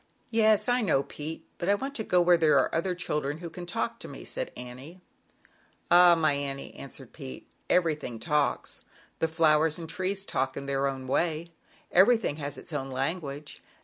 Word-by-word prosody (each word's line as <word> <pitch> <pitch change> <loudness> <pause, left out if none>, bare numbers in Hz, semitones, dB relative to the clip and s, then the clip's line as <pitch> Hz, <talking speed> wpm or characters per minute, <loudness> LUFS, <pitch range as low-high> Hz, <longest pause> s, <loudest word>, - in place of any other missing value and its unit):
"Yes, 220 -1 +4
I 245 0 +3
know, 155 -10 +2
Pete; 155 +3 -7
but 175 - -1
I 200 - +5
want 270 +6 -4
to 225 - -3
go 180 - +3
where 175 0 +6
there 160 -4 +4
are 130 - +2
other 180 +2 0
children 150 -4 -2
who 170 0 -8
can 175 -1 -8
talk 115 -9 -2
to - - -7
me,' - - -9
said - - -3
Annie 130 +8 -9 0.5
\ - - -34
"Ah, 175 0 +8
my 155 -3 +2
Annie," 140 -1 -4
answered - - -10
Pete, 65 -1 -9 0.2
"everything 155 -9 +1
talks; 150 +3 0 0.4
the 160 - +2
flowers 160 -1 +3
and 165 -2 -7
trees 190 +3 -2
talk 130 -5 -1
in 140 - -5
their 140 0 0
own 135 -1 -4
way. 165 +4 0 0.4
Everything 200 -4 +4
has 145 -1 -5
its - - -9
own 135 -2 -3
language. 140 +1 -4
160 Hz, 185 wpm, -28 LUFS, 140-180 Hz, 0.5 s, Ah